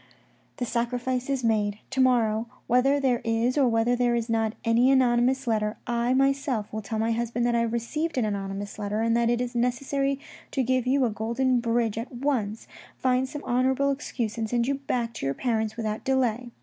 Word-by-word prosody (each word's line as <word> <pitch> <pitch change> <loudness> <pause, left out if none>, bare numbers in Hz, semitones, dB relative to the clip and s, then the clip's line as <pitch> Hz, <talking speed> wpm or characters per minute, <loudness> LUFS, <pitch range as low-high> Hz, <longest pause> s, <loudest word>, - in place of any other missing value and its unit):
The 245 - -2
sacrifice 245 +2 -2
is 270 -2 -1
made; 210 -3 +1
to 265 0 +1
morrow, 230 -3 +2 0.2
whether 270 +4 +3
there 255 -3 +1
is 230 +2 +1
or 280 -3 +4
whether 230 +1 +2
there 245 -1 +2
is 235 0 -2
not 225 -1 +1
any 230 +3 +4
anonymous 260 0 +3
letter, 215 -2 0
I 240 +1 +1
myself 270 -5 0
will 220 - -3
tell 220 +2 -4
my 225 +1 +1
husband 235 +1 0
I 235 -1 +2
have 230 -1 0
received 285 +8 -2
an 245 - +2
anonymous 200 0 -4
letter 210 +1 -2
and 230 0 +2
that 235 0 +2
it 240 0 +1
is 250 0 -3
necessary 275 +3 0 0.3
to 265 - +1
give 255 0 0
you 265 0 +3
a 230 - 0
golden 235 +4 0
bridge 230 -2 0
at 230 - -6
once, 240 -5 -2 0.3
find 255 0 +1
some 295 0 -7
honourable 260 +3 +2
excuse, 235 -5 -3
and 220 -1 -2
send 240 0 +1
you 280 - +2
back 250 -4 -2
to 220 - -5
your 135 - -1
parents 220 -3 -1
without 215 -2 -3
delay. 250 -2 0
240 Hz, 200 wpm, -26 LUFS, 225-260 Hz, 0.3 s, or